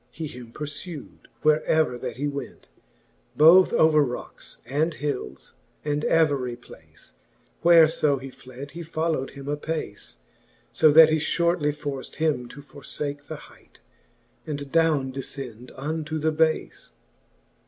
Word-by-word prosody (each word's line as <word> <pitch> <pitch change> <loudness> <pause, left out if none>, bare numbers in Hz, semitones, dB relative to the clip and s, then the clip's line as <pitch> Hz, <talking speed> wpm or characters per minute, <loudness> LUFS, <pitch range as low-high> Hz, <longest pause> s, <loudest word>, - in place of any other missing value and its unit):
He 160 - -6
him 125 -5 -10
purfewd, 150 +3 -8 0.2
where 155 0 +4
ever 155 -5 +2
that 120 - -6
he 145 +2 -1
went: 140 -1 -7 0.7
Both 170 +5 +7
over 155 -1 +4
rockes, 125 -3 -7
and 150 +6 0
hilles, 145 -3 -5 0.3
and 150 0 -1
every 140 -7 +2
place, 120 - -15 0.5
Where 170 -2 +7
fo 150 -2 +1
he 135 0 -8
fled, 130 +2 -11
he 170 - -8
folio 160 -4 -2
wd - - -15
him 140 0 -9
apace: 145 -7 -4 0.6
So 155 - +5
that 160 +1 +8
he 160 - +3
fliortly 170 -1 +1
forcd 140 -3 -6
him 150 -6 0
to 145 +3 -11
forfake 145 +1 -7
The 155 - -5 0.2
hight, - - -22 0.7
and 145 -2 -5
downe 155 -5 +2
dcfcend 130 -3 -7
unto 155 +2 -3
the 155 +1 +1
bafe. 160 0 0
150 Hz, 140 wpm, -25 LUFS, 135-160 Hz, 0.7 s, that